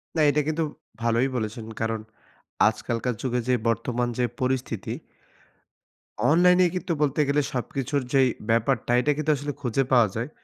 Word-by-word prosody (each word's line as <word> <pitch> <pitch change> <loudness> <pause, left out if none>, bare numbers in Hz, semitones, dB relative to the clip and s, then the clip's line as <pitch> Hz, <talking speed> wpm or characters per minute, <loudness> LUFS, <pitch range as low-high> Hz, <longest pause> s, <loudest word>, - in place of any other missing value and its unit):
না 160 - +2
এটা 150 +1 +2
কিন্তু 160 +1 0 0.4
ভালোই 115 +2 +2
বলেছেন। 110 -1 -3 0.2
কারণ 115 0 -1 0.7
আজকালকার 115 +3 -1
যুগে 125 -1 0
যে 125 - +4
বর্তমান 120 +2 0
যে 125 - +3 0.2
পরিস্থিতি 130 -5 -2 1.3
অনলাইনেই 180 +3 +5
কিন্তু 180 -1 -1
বলতে 150 0 +2
গেলে 145 +1 +2
সবকিছুর 135 +3 -2
যেই 135 -1 +5 0.2
ব্যাপারটা 115 +2 +1
এটা 150 - +2
কিন্তু 155 0 +1
আসলে 145 +1 -4
খুঁজে 130 0 +1
পাওয়া 120 -3 +6
যায়। 115 +5 -3
130 Hz, 145 wpm, -25 LUFS, 115-145 Hz, 1.3 s, পাওয়া